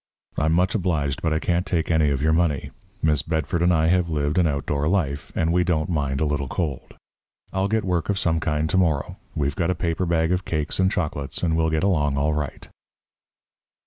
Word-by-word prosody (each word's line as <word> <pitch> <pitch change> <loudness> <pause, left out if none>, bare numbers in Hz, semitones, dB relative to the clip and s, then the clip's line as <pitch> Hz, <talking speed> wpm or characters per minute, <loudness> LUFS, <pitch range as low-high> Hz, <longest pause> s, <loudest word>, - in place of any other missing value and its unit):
I'm 80 +2 +1
much 90 +3 +2
obliged, 80 -9 -1
but 80 - 0
I 80 - +2
can't 85 +2 0
take 85 -4 -1
any 80 -2 +3
of 70 0 -1
your 80 +1 +3
money. 80 -5 0 0.3
Miss 75 -3 +3
Bedford 80 +2 -1
and 90 +1 +4
I 80 -2 +3
have 90 -1 +2
lived 75 +1 0
an 85 - +4
outdoor 70 0 -1
life, 80 -6 -1
and 80 +1 +1
we 90 0 +3
don't 80 -2 0
mind 70 -4 -1
a 80 - +1
little 75 -2 -1
cold. 75 -3 -4 0.6
I'll 95 +1 +1
get 110 0 0
work 90 -1 -1
of 100 - +1
some 80 -3 +1
kind 75 -1 0
to 95 - +2
morrow. 80 -6 0 0.2
We've 70 -1 -1
got 85 -1 0
a 90 - +1
paper 85 +1 -1
bag 80 0 +1
of 90 0 0
cakes 75 -1 -2
and 95 0 +3
chocolates, 75 -3 -3
and 80 -2 +2
we'll 80 0 +2
get 80 +1 0
along 75 -8 +1
all 75 +2 +1
right." 75 -3 -4
80 Hz, 215 wpm, -23 LUFS, 75-90 Hz, 0.6 s, and